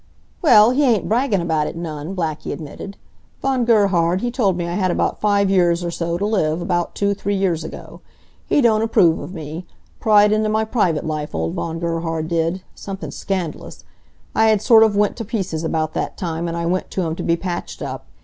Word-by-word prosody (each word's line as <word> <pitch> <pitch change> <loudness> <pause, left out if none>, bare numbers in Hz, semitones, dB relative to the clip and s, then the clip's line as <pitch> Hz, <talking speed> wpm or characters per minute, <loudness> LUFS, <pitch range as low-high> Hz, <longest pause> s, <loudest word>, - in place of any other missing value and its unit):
"Well, 220 -8 +6
he 280 +3 +2
ain't 235 -7 +2
braggin' 225 -4 +1
about 160 -3 0
it - - -6
none," 160 +1 -5
Blackie 160 -4 -3
admitted. 165 +6 -8 0.4
"Von 265 -3 0
Gerhard, 190 -6 +3
he 245 - -1
told 205 -8 +1
me 170 -1 -2
I 170 - -3
had 185 0 0
about - - -1
five 200 -1 +3
years 175 -2 +3
or 170 - -2
so 170 0 -2
t' 200 - -1
live, 170 -7 0
about 175 -1 -1
two, 200 0 +1
three 200 0 -2
years 180 -5 0
ago. - - -9 0.5
He 290 - +3
don't 220 -3 +3
approve 180 -7 +3
of - - -7
me. 160 0 -7 0.3
Pried 210 -1 +5
into 215 0 +1
my 220 +1 +1
private 195 -9 0
life, 155 -1 -4
old 80 +1 -2
Von 165 0 -3
Gerhard 165 -1 -2
did, 170 +2 -1
somethin' 195 0 -7
scand'lous. 185 -5 -5 0.5
I 220 - +3
had 215 -1 +4
sort 225 -2 +7
of 220 -2 +4
went 205 -1 +1
to 230 - -4
pieces 190 -8 -3
about 160 -1 -1
that - - -3
time, 170 -2 -3
and 170 0 -3
I 170 - -2
went 185 +2 -1
t' - - -4
him 165 -3 -1
to - - -4
be 170 0 +1
patched 175 -1 -5
up. - - -6
180 Hz, 205 wpm, -20 LUFS, 165-210 Hz, 0.5 s, sort